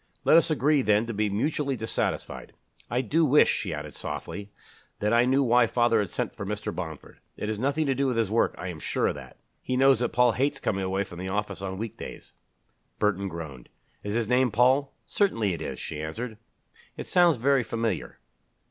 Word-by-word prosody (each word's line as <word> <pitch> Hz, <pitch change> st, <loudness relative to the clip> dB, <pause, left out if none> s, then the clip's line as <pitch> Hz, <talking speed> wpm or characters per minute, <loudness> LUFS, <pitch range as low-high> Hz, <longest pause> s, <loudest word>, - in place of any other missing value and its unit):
"Let -, -, +5 dB
us 165 Hz, +1 st, +5 dB
agree, 150 Hz, 0 st, +3 dB
then, 105 Hz, -1 st, +3 dB
to 115 Hz, -, -4 dB
be 105 Hz, 0 st, 0 dB
mutually 140 Hz, +6 st, -1 dB
dissatisfied. 110 Hz, -1 st, -3 dB, 0.4 s
I 120 Hz, +1 st, +1 dB
do 155 Hz, +7 st, +1 dB
wish," 150 Hz, 0 st, +5 dB
she 95 Hz, -, -3 dB
added 75 Hz, -1 st, -6 dB
softly, 100 Hz, 0 st, -6 dB, 0.5 s
"that 105 Hz, +2 st, +1 dB
I 120 Hz, +1 st, +5 dB
knew 135 Hz, +2 st, +3 dB
why 120 Hz, -1 st, +4 dB
father 120 Hz, -1 st, +2 dB
had 100 Hz, -3 st, -1 dB
sent -, -, -3 dB
for -, -, -6 dB
Mr. -, -, -4 dB
Bomford. -, -, -7 dB, 0.2 s
It 105 Hz, -, -3 dB
is 110 Hz, -1 st, -3 dB
nothing 140 Hz, +5 st, 0 dB
to 135 Hz, -, +2 dB
do 135 Hz, +1 st, 0 dB
with 125 Hz, -3 st, -1 dB
his 110 Hz, -3 st, +1 dB
work, 115 Hz, -, +2 dB
I 90 Hz, -, -5 dB
am 85 Hz, -3 st, -7 dB
sure -, -, -1 dB
of -, -, -1 dB
that. -, -, -12 dB, 0.2 s
He 130 Hz, -, -2 dB
knows 135 Hz, -2 st, +5 dB
that 120 Hz, -, 0 dB
Paul 125 Hz, 0 st, +4 dB
hates 135 Hz, +5 st, 0 dB
coming 95 Hz, -1 st, -1 dB
away 95 Hz, +1 st, 0 dB
from 85 Hz, -3 st, -11 dB
the 95 Hz, +1 st, -4 dB
office 100 Hz, -2 st, -3 dB
on 95 Hz, -1 st, -4 dB
week 110 Hz, +1 st, -5 dB
days." -, -, -9 dB, 0.6 s
Burton 100 Hz, -2 st, 0 dB
groaned. 80 Hz, -8 st, -8 dB, 0.3 s
"Is 105 Hz, +1 st, -3 dB
his 115 Hz, -2 st, 0 dB
name 125 Hz, +1 st, +3 dB
Paul?" 130 Hz, +5 st, +3 dB
"Certainly 115 Hz, -, +1 dB
it 85 Hz, -, -6 dB
is," -, -, -4 dB
she 75 Hz, -1 st, -5 dB
answered. 110 Hz, +8 st, -5 dB, 0.6 s
"It -, -, -5 dB
sounds 175 Hz, -5 st, +4 dB
very 135 Hz, +3 st, +3 dB
familiar." 115 Hz, -3 st, -3 dB
115 Hz, 210 wpm, -27 LUFS, 100-130 Hz, 0.6 s, Let